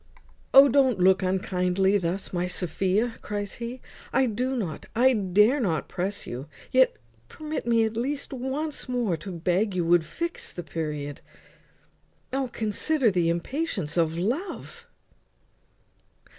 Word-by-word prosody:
"O! 275 +1 +9
don't 265 -4 +3
look 190 +1 +5
unkindly 190 +1 +1
thus, 185 +2 -3
my 175 0 0
Sophia," 190 +6 0
cries 205 -1 -4
he. 240 +2 -5 0.3
"I 265 - +3
do 250 +3 -1
not, 180 - -4
I 255 +3 +5
dare 210 +5 +3
not 165 - -1
press 195 +3 -3
you. 130 +4 -6 0.2
Yet 260 0 +4 0.3
permit 310 -4 -5
me 230 -1 +4
at 220 0 -3
least 275 +5 -2
once 270 +3 -3
more 240 -8 0
to 190 +4 -8
beg 180 +4 0
you 175 -2 0
would 170 0 +4
fix 335 - -4
the 175 - -6
period. 150 -2 -4 1.1
O! 265 -1 -1
consider 230 +4 +1
the 175 -3 +1
impatience 175 - -2
of 165 -1 +1
love." 345 - -4
205 Hz, 135 wpm, -26 LUFS, 180-255 Hz, 1.1 s, O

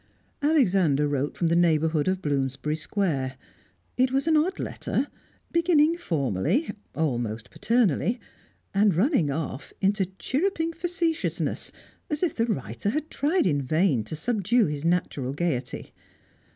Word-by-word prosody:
Alexander 190 - +3
wrote 145 0 -1
from 175 - 0
the 165 0 +3
neighbourhood 160 -2 +2
of 185 0 0
Bloomsbury 140 +1 -1
Square; 150 -5 -1 0.6
it 255 0 +3
was 270 +1 +1
an 320 -1 +3
odd 345 +6 +2
letter, 280 - -2 0.4
beginning 335 -2 +4
formally, 160 - 0 0.2
almost 120 -6 -2
paternally, 230 - +1 0.5
and 200 -2 +4
running 195 - +2
off 140 -1 -4
into 195 -1 +2
chirruping 330 +2 0
facetiousness, 340 -1 -1 0.4
as 300 +3 -2
if 345 - +1
the 230 0 0
writer 135 - -2
had 305 +7 -2
tried 315 +6 +1
in 145 -6 +2
vain 145 - +2
to 155 - -5
subdue 225 +5 +2
his 150 -1 -3
natural 165 -6 0
gaiety. 145 -6 -2
185 Hz, 130 wpm, -26 LUFS, -, 0.6 s, beginning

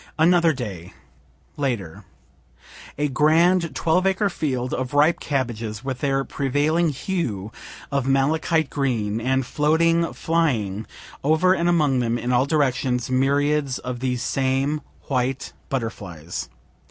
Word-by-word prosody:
Another 170 +1 +4
Day, 100 - -6 0.6
later. 120 - -3 0.9
A 150 +1 +1
grand 165 +5 +3
twelve 180 +3 +2
acre 195 +1 +1
field 130 -6 -2
of 130 +2 -3
ripe 150 +4 +4
cabbages 115 -5 -3
with 130 -2 -4
their 135 -1 +1
prevailing 145 +6 +1
hue 125 - -3 0.4
of 140 -2 0
malachite 155 +3 +1
green, 115 -6 -1
and 130 +2 +1
floating 165 +5 +2
flying 115 -12 0 0.4
over 160 +6 +4
and 170 -1 +1
among 150 -7 +2
them 120 -1 0
in 120 +1 -2
all 125 +2 +3
directions 130 -5 0
myriads 140 +1 +1
of 125 -1 -5
these 125 -1 -1
same 135 +3 0 0.2
white 130 0 -2 0.2
butterflies. 90 - -5
135 Hz, 120 wpm, -23 LUFS, 125-155 Hz, 0.9 s, Another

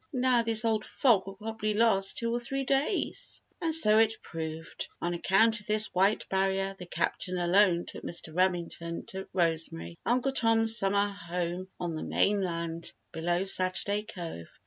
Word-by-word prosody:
Now, 255 -3 +2
this 225 0 +6
old 220 -1 0
fog 225 -9 +1
will 195 - -8
probably 215 0 -4
last 205 -3 +2
two 230 0 -2
or 240 - -1
three 270 +3 -3
days." 275 +8 -1 0.2
And 325 -2 +1
so 215 -9 +6
it 225 0 +1
proved. 160 0 -7
On 175 0 -2
account 220 +6 +2
of 210 - -15
this 215 0 +4
white 195 +4 +1
barrier 195 0 -1
the 180 - -9
Captain 180 +1 -2
alone 175 0 +2
took - - -10
Mr. 165 -2 -2
Remington 170 -2 -2
to 190 0 -7
Rosemary, 160 - -2
Uncle 250 +3 0
Tom's 225 -3 +5
summer 200 -1 +3
home 180 -2 -5
on 175 -2 -3
the 155 - -5
mainland 170 - -1 0.2
below 175 +2 -1
Saturday 195 +2 +2
Cove. 175 - -9
195 Hz, 160 wpm, -28 LUFS, 175-225 Hz, 0.2 s, this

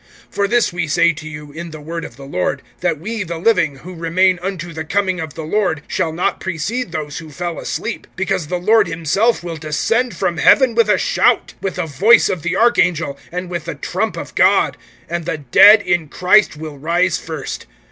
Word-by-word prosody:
(15)For 200 -1 0
this 235 -6 +2
we 175 -2 -2
say 170 +3 +3
to 155 0 -9
you, 150 -1 -9
in 170 +3 -7
the 155 -1 -9
word 165 +3 -6
of 120 - -9
the 135 +2 -11
Lord, 90 -10 -2 0.2
that 155 - -1
we 220 +6 -4
the 170 -3 -4
living, 170 -6 +2
who 175 +7 -11
remain 175 +2 +1
unto 180 -3 -5
the 160 +1 -5
coming 185 +3 0
of 160 -3 -6
the 160 - -6
Lord, 160 -3 -1
shall 170 -4 -1
not 170 +3 -1
precede 190 +6 -3
those 155 -3 -4
who 160 -1 -10
fell 170 +3 -5
asleep. 230 +1 -4
(16)Because 190 -4 -1
the 180 - -1
Lord 210 +3 +3
himself 175 +8 0
will 170 -2 -5
descend 215 +11 -1
from 170 - -1
heaven 255 - +5
with 225 -2 +3
a - - +4
shout, - - +1
with 195 - -3
the 180 - -2
voice 195 - +4
of 180 - -2
the 175 +2 -2
archangel, 180 -10 +2 0.2
and 180 +1 -4
with 175 -2 -5
the - - -5
trump - - -3
of - - -7
God; - - +3 0.3
and 170 -1 -4
the 165 -2 -2
dead 205 - +6
in 175 -4 0
Christ 185 -1 +3
will 150 -2 -8
first 170 +3 0
rise. 160 -4 -6
175 Hz, 210 wpm, -18 LUFS, 160-195 Hz, 0.3 s, dead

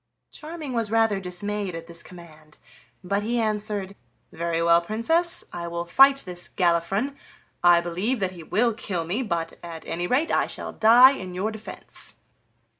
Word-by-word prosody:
Charming 310 -3 -7
was 230 -3 -1
rather 225 -2 +2
dismayed 195 +1 -4
at 165 0 -7
this 170 0 -8
command, 155 -4 -14 0.5
but 200 +3 -1
he 235 +3 -1
answered: 210 -3 -2 0.4
"Very 165 0 -2
well, 170 0 +4
Princess, 325 - +2
I 170 -1 -5
will 170 0 -4
fight 270 +9 +5
this 180 -1 -7
Galifron; 185 +9 0 0.5
I 175 -1 +6
believe 185 +9 -2
that 190 -2 -1
he 175 -2 -11
will 230 +8 +1
kill 185 -6 -4
me, 195 +10 -2
but 170 -8 -3
at 165 -2 -9
any 175 +1 -3
rate 280 - +1
I - - +2
shall - - -7
die 240 +4 +7
in 185 -9 -6
your 200 +4 -1
defense." 220 0 -3
195 Hz, 165 wpm, -24 LUFS, 170-225 Hz, 0.5 s, die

